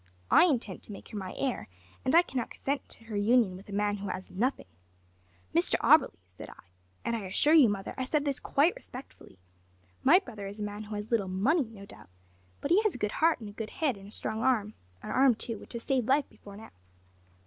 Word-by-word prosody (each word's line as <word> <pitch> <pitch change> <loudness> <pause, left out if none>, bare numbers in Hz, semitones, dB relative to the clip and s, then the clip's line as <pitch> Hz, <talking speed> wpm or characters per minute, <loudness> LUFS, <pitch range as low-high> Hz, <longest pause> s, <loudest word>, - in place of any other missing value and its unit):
I - - +7
intend 240 - -1
to - - -8
make 200 - -10
her 215 - -7
my 185 -1 -7
heir, 265 -3 -2 0.4
and 260 - +2
I 340 - +8
cannot 260 -8 -4
consent 275 0 -3
to - - -7
her 225 -2 -7
union 210 -1 +3
with 195 +3 -13
a - - -8
man 205 +1 0
who 200 0 -6
has 185 - -6
nothing.' 245 +9 -1 0.9
`Mr - - +3
Auberly,' - - +4
said 90 0 -11
I - - -11 0.5
(and 235 - 0
I 215 -4 -4
assure 285 +11 +4
you, 295 -8 +7
mother, 195 -1 -4
I - - 0
said 290 +2 0
this 280 -2 -1
quite 315 - +2
respectfully), 260 - -12 0.7
`my 355 +8 +5
brother 210 -5 -7
is 200 +2 -8
a - - -3
man 205 +1 -5
who 210 0 -6
has 210 +2 -6
little 215 -5 +1
money, 230 - +1
no 200 -3 -11
doubt, 145 - -15 0.5
but 280 - -3
he 385 +5 +6
has 430 -4 0
a - - -4
good 210 -3 -1
heart 325 -5 +3
and 215 - -7
a - - -12
good 220 0 -6
head 290 -7 -1
and 195 0 -12
a - - -11
strong 220 0 -2
arm; 220 -5 +1 0.3
an - - -5
arm, 265 -2 +4
too, 230 -1 -5
which - - -11
has 235 -1 -4
saved 255 -4 0
life 275 +1 +3
before 200 -1 -14
now.' 220 - -12
225 Hz, 235 wpm, -29 LUFS, 205-275 Hz, 0.9 s, I